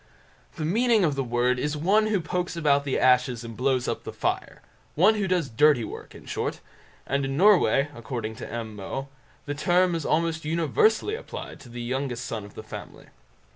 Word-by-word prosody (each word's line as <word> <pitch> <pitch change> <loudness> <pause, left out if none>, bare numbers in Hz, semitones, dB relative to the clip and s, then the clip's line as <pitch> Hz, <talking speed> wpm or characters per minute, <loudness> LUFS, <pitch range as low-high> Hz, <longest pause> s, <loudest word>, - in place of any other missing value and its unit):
The 155 - -3
meaning 225 +4 +3
of 150 - +1
the 135 -1 -1
word 125 +1 +1
is 150 +2 -1
"one 205 +8 +3
who 210 -4 +1
pokes 180 +2 -2
about 145 -3 +2
the 135 - 0
ashes 125 -2 +3
and 115 -1 -8
blows 130 0 +1
up - - -3
the - - -6
fire"; - - -3 0.3
one 185 +8 +5
who 205 -3 -1
does 180 -5 +1
dirty 135 +1 +4
work - - -9
in - - -13
short; - - -3 0.5
and 140 +1 0
in 135 0 -2
Norway, 185 -7 +5
according 115 -2 -5
to - - -7
M. 115 -2 -5
Moe, 135 +7 -5 0.4
the 145 - -3
term 180 +4 +2
is 165 -2 -2
almost 160 +1 0
universally 170 - +2
applied 470 +3 -7
to 125 - -13
the 120 0 -6
youngest 125 -1 -3
son 115 -2 -4
of 100 - -14
the 110 - -8
family. 110 - -10
145 Hz, 195 wpm, -26 LUFS, 125-175 Hz, 0.5 s, one